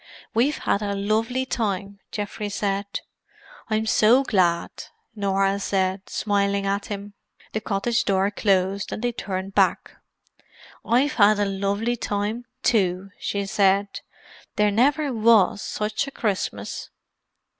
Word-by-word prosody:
"We've 255 +7 +2
had 200 - 0
a 200 -1 -2
lovely 220 +6 0
time!" 200 -5 -2
Geoffrey 205 0 -4
said. 200 0 -2 0.7
"I'm 220 0 0
so 225 +4 +5
glad," 180 -8 +1 0.4
Norah 195 -1 +1
said, 190 -1 -1
smiling 200 -1 0
at 200 +1 -1
him. 205 0 -6 0.4
The 220 - -1
cottage 225 +4 0
door 195 0 +2
closed, 195 -1 +1
and 215 - -5
they 245 - +1
turned 195 -3 -5
back. - - +1 0.9
"I've 260 +5 +2
had 210 -1 +5
a 205 - +1
lovely 200 +4 -1
time, 210 +3 -2 0.2
too!" 195 -4 +1
she 200 -1 -2
said. 200 0 +2 0.6
"There 210 0 +3
never 280 +6 +2
was 220 -3 +4
such 215 +5 -2
a - - -6
Christmas!" 210 -7 -3
205 Hz, 125 wpm, -24 LUFS, 195-220 Hz, 0.9 s, so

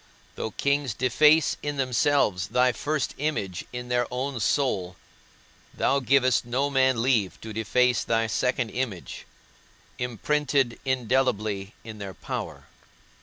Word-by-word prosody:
Though - - -4
kings 140 0 0
deface 150 +4 +4
in 145 -1 -3
themselves 125 -7 +1
thy 125 0 +3
first 150 +4 -2
image 105 - -2
in 125 0 -6
their 120 -1 +1
own 130 +1 -3
soul, 100 -7 0 0.8
thou 140 - +2
givest 130 -1 +3
no 130 +4 -1
man 130 -3 +3
leave 110 -9 +1
to 110 -1 -7
deface 125 +3 +2
thy 115 0 +1
second 125 +1 -1
image, 115 -9 -5 0.7
imprinted 130 +2 0
indelibly 115 -6 0
in 110 -1 -9
their 100 -3 -7
power. - - -6
125 Hz, 120 wpm, -26 LUFS, 110-135 Hz, 0.8 s, deface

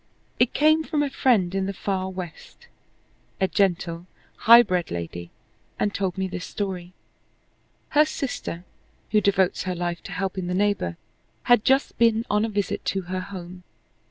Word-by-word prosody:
It 245 - +2
came 310 +2 +4
from 305 -2 0
a 280 - -2
friend 210 -11 +2
in 195 0 -1
the 195 - -4
far 190 -1 -2
West, 185 - -9 0.7
a 190 - +2
gentle, 175 -3 0 0.4
high 235 +1 +11
bred 180 -5 -1
lady, 85 0 -5 0.5
and 205 - 0
told 190 -2 -2
me 190 0 -1
this 180 -1 -6
story: 185 -3 -5 1.0
Her 300 0 +5
sister, 260 - -4 0.5
who 210 0 +4
devotes 195 -2 +1
her 185 -1 -2
life 175 0 -3
to - - -7
helping 190 -1 -3
the 180 - -1
neighbor, 200 - 0 0.5
had 245 -3 +4
just 270 +1 +2
been 230 -1 +3
on 210 +1 +2
a 225 - 0
visit 205 -3 -2
to 195 - 0
her 185 - -1
home. 185 -2 -9
195 Hz, 160 wpm, -24 LUFS, 180-220 Hz, 1.0 s, high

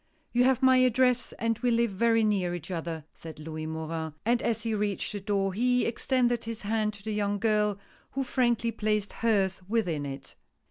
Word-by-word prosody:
" - - -41
You 245 +1 +4
have 265 0 +2
my 260 0 +6
address, 255 0 +3
and 230 0 -1
we 245 +1 +1
live 235 -1 +2
very 225 +3 +3
near 190 -5 +1
each 175 +1 -8
other," 165 -3 -4
said 160 -1 -10
Louis 155 0 -6
Morin, 160 0 -4
and 235 +1 +2
as 225 -1 -1
he 225 -1 -1
reached 205 -2 -1
the 205 - -4
door 195 -1 0
he 250 +4 +2
extended 240 0 +1
his 230 -1 -5
hand 215 0 0
to 200 - -15
the 215 0 -3
young 205 -1 0
girl, 210 -1 +1 0.4
who 270 - -1
frankly 240 -3 +1
placed 210 -2 -1
hers 195 -5 +1
within 175 -10 0
it. 135 0 -8
215 Hz, 195 wpm, -28 LUFS, 190-235 Hz, 0.4 s, my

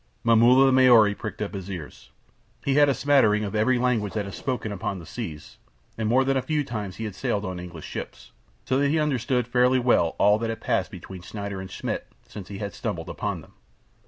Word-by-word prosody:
Momulla 120 +3 +6
the 135 - +4
Maori 120 -5 +6
pricked 105 0 -5
up 105 - -5
his 95 -1 -6
ears. 85 -6 -8 0.6
He 140 - +2
had 145 0 +5
a - - +3
smattering 115 -7 +3
of 100 - -4
every 110 +4 +2
tongue 120 -4 +1
that 105 0 -3
is 100 - -7
spoken 120 -5 -3
upon 100 0 -3
the 85 - -10
seas, 80 -7 -8 0.4
and 110 -1 -2
more 130 +3 +4
than 135 +1 +1
a 135 - +2
few 150 +2 -1
times 105 -7 -5
had 110 - -4
he 105 - -4
sailed 100 +2 -2
on 95 -1 -4
English 85 -3 -9
ships, - - -8 0.3
so 130 - +1
that 140 0 +2
he 160 - +2
understood 125 -5 0
fairly 125 +1 +3
well 120 -10 +2
all 105 +1 +4
that 115 0 -2
had 115 - -4
passed - - 0
between 95 -2 -10
Schneider 100 +1 -6
and 95 - -8
Schmidt - - -4 0.2
since 100 -3 -9
he 100 - -7
had 100 0 -5
stumbled - - -4
upon - - -3
them. - - -18
110 Hz, 220 wpm, -25 LUFS, 100-130 Hz, 0.6 s, Momulla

